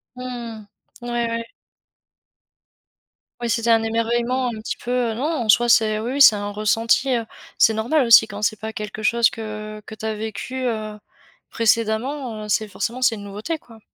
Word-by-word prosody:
Mmh. 235 -4 -7 0.3
Ouais, 240 - -7 0.2
ouais. 230 0 -3 2.0
Oui, 240 - -2
c'était 230 +1 +1
un 225 0 +4
émerveillement 235 +3 0
un 225 -2 -4
petit 220 - -5
peu. 245 -2 -1
Non, 240 - -4
en 295 -8 -1
soi 240 +3 +5
c'est 220 -2 +4
oui, 235 +4 -3
oui 285 - 0
c'est 220 - +9
un 205 0 -4
ressenti, 225 +5 +1
heu, 230 -1 -2 0.3
c'est 225 - +5
normal 245 +6 +1
aussi 225 -1 +7
quand 205 0 -8
c'est 210 0 0
pas 220 +1 -6
quelque 215 0 -6
chose 230 +1 +3
que 215 -1 -7
que 220 - -9
tu 220 - -8
as 220 - -1
vécu, 220 +4 -5
heu, 215 -3 -3 0.5
précédemment, 230 +2 0
heu, - - -8
c'est 215 +1 0
forcément 235 +5 -4
c'est 245 -3 +3
une 205 - -9
nouveauté, 210 +11 -4
quoi. 230 -6 -17
225 Hz, 180 wpm, -22 LUFS, 215-240 Hz, 2.0 s, c'est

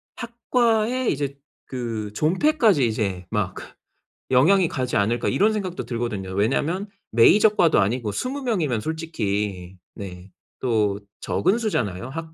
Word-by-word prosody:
학과에 235 0 0
이제 140 -1 -2 0.3
그 115 -5 -4
존폐까지 195 - +3
이제 100 -5 -2
막 105 -4 -2
그 - - -7 0.7
영향이 170 +8 +5
가지 125 -3 -1
않을까 110 +4 +1
이런 215 +3 +2
생각도 185 -4 -4
들거든요. 115 -6 -4
왜냐하면 145 - 0 0.2
메이저 200 - +6
과도 175 - +3
아니고 105 +2 0
20 260 - -3
명이면 160 - 0
솔직히 105 - -3 0.2
네 95 -1 -9 0.3
또 105 -5 +1 0.2
적은 195 +7 +1
수잖아요. 115 - -2
학 160 +3 -7
130 Hz, 280 characters per minute, -23 LUFS, -, 0.7 s, 메이저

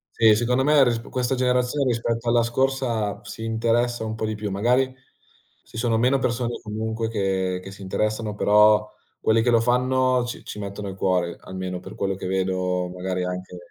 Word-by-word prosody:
Sì, 110 -2 +6
secondo 125 +4 +1
me 150 -1 +5
risp 115 -2 -1
questa 125 0 -1
generazione, 125 +2 +1
rispetto 115 0 -1
alla 120 0 +4
scorsa, 120 -3 0
si 110 - -7
interessa 115 +1 0
un 110 0 -3
po' 110 - -2
di 110 - -2
più. 105 -1 -4
Magari 125 +6 +2 0.7
ci 115 - -10
sono 115 -1 +1
meno 130 +3 +3
persone 120 -1 -1
comunque 110 +1 -3
che 95 -4 -1
che 95 - -9
si 100 - -13
interessano, 105 +2 -2
però 105 +1 +5 0.3
quelli 110 +1 +3
che 120 - +2
lo 115 -1 +4
fanno 125 +1 +2
ci 120 - -7
ci - - -8
mettono 100 0 -5
il 95 - -7
cuore, 90 -3 0
almeno 95 -1 -5
per - - -10
quello 95 -1 -2
che 95 - -6
vedo 90 -1 -1
magari 90 0 -3
anche 90 0 -5
110 Hz, 185 wpm, -24 LUFS, 95-120 Hz, 0.7 s, Sì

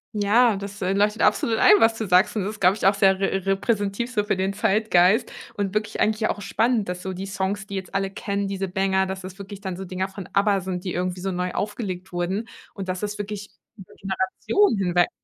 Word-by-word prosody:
Ja, 215 +3 +4
das, 200 +1 -8
äh, 190 +1 +1
leuchtet 210 +2 +1
absolut 220 +1 +2
ein, 415 - +7
was 225 -6 +4
du 220 -2 -4
sagst, 180 +5 +4
und 210 - 0
das 205 +3 -3
ist, 215 - -12
glaube 185 +1 +5
ich, 205 - +1
auch 195 - +4
sehr 195 -1 +4
re 195 -1 -1
repräsentativ 205 +3 0
so 210 -4 +1
für 210 - 0
den 190 +1 -1
Zeitgeist 200 +1 +3 0.2
und 200 -1 -2
wirklich 215 0 -2
eigentlich 215 +1 +1
ja 215 - +2
auch 205 - -6
spannend, 220 0 0
dass 180 0 -5
so 190 - -4
die 190 +2 -6
Songs, 200 +1 -3
die 200 - -6
jetzt 190 -1 -6
alle 195 0 0
kennen, 200 0 -3
diese 195 0 -3
Banger, 190 0 +1
dass 190 0 -5
das 185 0 -9
wirklich 200 0 -9
dann 190 -3 -4
so 190 - -6
Dinger 185 +1 -3
von 190 -1 -9
ABBA 200 -1 +3
sind, 180 -1 -4
die 180 - -3
irgendwie 180 +1 -2
so 195 +1 -2
neu 180 0 -2
aufgelegt 190 -3 -4
wurden 185 +5 -2 0.3
und 195 -2 -6
dass 185 0 -3
das 210 -1 -2
ist - - -12
wirklich 205 0 -5 0.3
über 190 - -13
Generationen 195 - +1
hinweg 175 -2 +2
195 Hz, 240 wpm, -24 LUFS, 190-210 Hz, 0.3 s, ein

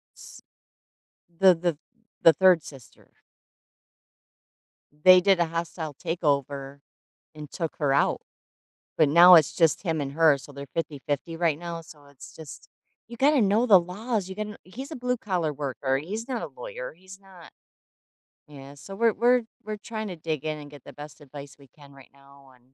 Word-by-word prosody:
S - - -14 0.9
the 180 +2 +4
the 170 -2 -2 0.4
the 165 - +8
3rd 185 -2 +4
sister. 135 -5 -15 1.8
They 180 +5 +6
did 190 -1 +3
a 170 - +3
hostile 165 -2 -5
takeover 140 -4 -2 0.6
and 150 -2 -10
took 165 -3 -4
her 145 -3 +1
out, 140 - +1 0.8
but 155 - +4
now, 175 +4 +8
it's 155 -3 +3
just 165 -3 +2
him 165 -5 -2
and 140 -1 -4
her, 155 -2 +4
so 145 - -13
they're 140 0 -9
50-50 150 0 -4
right 165 -3 0
now, 170 0 -6
so, 150 -3 -16
it's 140 -1 -15
just 155 -4 -12 0.4
you 235 - -10
gotta 280 +3 +3
know 210 +4 +2
the 200 -6 +7
laws. 200 +3 -4
You 190 - -7
gon 210 -1 -5
he's 260 - -9
a - - -5
blue 250 0 -2
collar 180 -8 -2
worker, 135 -1 -2
he's 210 - -6
not 250 -3 -3
a - - -4
lawyer. - - -8
He's 190 +1 -15
not 190 -3 -16 1.0
yeah, 140 -1 -12
so, 170 +8 -11
we're 230 +1 +2
we're 245 +2 +3 0.2
we're 215 0 -5
trying 220 0 -6
to 180 - -6
dig 155 -2 -4
in 155 -1 -3
and 145 -1 -11
get 145 -3 -14
the - - -11
best 150 +1 -12
advice 140 0 -11
we 140 - -18
can 145 -2 -17
right 135 -1 -17
now, 140 -1 -20
and 125 +1 -30
165 Hz, 175 wpm, -25 LUFS, 145-195 Hz, 1.8 s, the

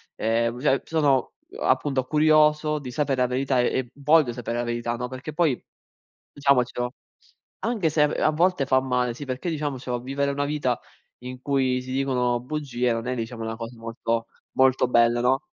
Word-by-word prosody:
ehm, 115 +2 0
cioè 135 0 +2
sono, 145 -5 +1 0.2
uhm, 430 +6 -8
appunto 135 -3 +1
curioso 150 +1 +3
di 135 -4 -7
sapere 135 -1 0
la 125 - +3
verità 130 +1 0
e 125 +1 +1
v - - -22
voglio 145 -2 +3
sapere 120 -1 -4
la 120 - 0
verità, 120 0 -2
no, 125 +1 -3
perché 130 +4 -7
poi 155 -5 +1 0.7
diciamocelo, 125 -3 +1 0.7
anche 215 -9 +1
se 150 0 +2
a - - +6
v - - -2
a 155 - +4
volte 170 -1 +2
fa 130 -1 +4
male, 125 -2 0
sì 145 - -7
perché 130 +6 -3
diciamocelo 135 -5 -3
vivere 140 +3 -1
una 145 0 -1
vita 145 -5 -1 0.4
in 125 0 -7
cui 130 -2 +1
si 130 - -9
dicono 125 -2 +1
bugie 125 -3 -2
non 115 +1 -3
è 130 - 0
diciamo 115 0 -5
una 115 0 -4
cosa 115 +1 -7
molto 115 0 -2 0.3
molto 130 -1 +4
bella, 120 0 +4
no? 130 +2 +2
130 Hz, 185 wpm, -25 LUFS, 120-145 Hz, 0.7 s, a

